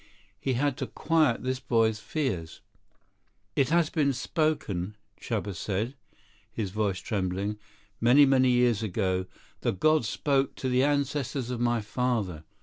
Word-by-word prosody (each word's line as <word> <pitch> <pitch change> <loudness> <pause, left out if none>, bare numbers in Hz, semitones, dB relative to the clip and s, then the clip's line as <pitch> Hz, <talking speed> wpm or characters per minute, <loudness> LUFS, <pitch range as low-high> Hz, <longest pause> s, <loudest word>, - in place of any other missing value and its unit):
He 130 - -1
had 140 +1 0
to - - -3
quiet 155 -8 +1
this 130 0 -1
boy's 115 -4 +1
fears. 105 - -3 0.9
"It 135 -1 +2
has 165 -1 +2
been 145 -4 +2
spoken," 125 - -1 0.2
Chuba 100 - -3
said, 105 +7 -2 0.6
his 105 -5 -3
voice 100 -2 0
trembling. 100 +2 -2 0.4
"Many, 125 +5 +6
many 130 -1 +4
years 120 -3 +3
ago, 95 -3 -1 0.3
the - - 0
gods 155 +4 +2
spoke 140 -2 0
to 130 - -3
the 125 +1 +3
ancestors 140 -3 0
of 125 - -3
my 120 -1 +1
father. 105 -8 -2
120 Hz, 140 wpm, -28 LUFS, 105-140 Hz, 0.9 s, Many